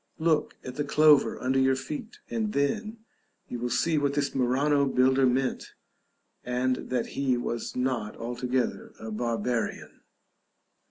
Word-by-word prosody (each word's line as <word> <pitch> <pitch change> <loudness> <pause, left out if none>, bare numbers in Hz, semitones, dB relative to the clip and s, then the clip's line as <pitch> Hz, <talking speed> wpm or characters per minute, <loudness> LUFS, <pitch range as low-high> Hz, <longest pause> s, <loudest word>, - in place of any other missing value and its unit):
Look 160 -1 +1
at 125 +1 -8
the 145 - 0
clover 150 0 +4
under 130 +1 +1
your 130 0 +4
feet, 230 - -6
and 225 -3 -2
then 215 +10 -1 0.4
you 120 - -5
will 120 +1 -2
see 155 +5 +2
what 140 -1 0
this 145 -1 0
Murano 140 +3 +2
builder 130 0 +3
meant, 130 +1 -1 0.7
and 125 +1 -1
that 125 -2 0
he 130 -3 +1
was 120 -1 -4
not 125 -4 -1
altogether 125 +1 -2
a 110 0 -6
barbarian. 115 +1 -2
130 Hz, 140 wpm, -27 LUFS, 125-145 Hz, 0.7 s, clover